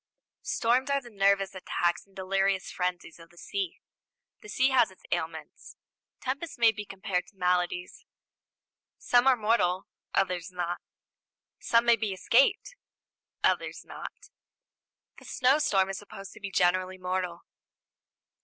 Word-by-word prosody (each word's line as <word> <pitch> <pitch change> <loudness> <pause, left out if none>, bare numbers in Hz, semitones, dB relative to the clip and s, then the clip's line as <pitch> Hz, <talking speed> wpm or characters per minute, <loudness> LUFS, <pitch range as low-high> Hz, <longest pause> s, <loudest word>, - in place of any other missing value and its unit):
Storms 250 +4 +1
are 280 0 +2
the 245 -3 -13
nervous 195 -1 +2
attacks 175 -1 -1
and 195 - -27
delirious 195 0 0
frenzies 180 -2 -3
of 165 0 -14
the 175 - -23
sea. 385 - -4 0.6
The 425 - -12
sea 260 -5 +2
has 265 - +4
its - - -19
ailments. - - -4 0.5
Tempests 280 +5 -4
may 230 -1 +6
be 210 -1 -7
compared 190 -2 -2
to - - -20
maladies. 180 -1 -1 0.9
Some 245 +1 +3
are 265 - +7
mortal, 210 -5 +1 0.3
others 180 -2 0
not; 175 -1 -3 0.8
some 230 0 +3
may 235 -1 +5
be 215 -4 -2
escaped, 275 - +2 0.7
others - - 0
not. - - -10 0.9
The - - -16
snowstorm 250 -8 +2
is 195 - -5
supposed 195 -1 -10
to - - -13
be 200 -2 -5
generally 185 0 +1
mortal. 180 -1 -3
195 Hz, 135 wpm, -29 LUFS, 180-240 Hz, 0.9 s, are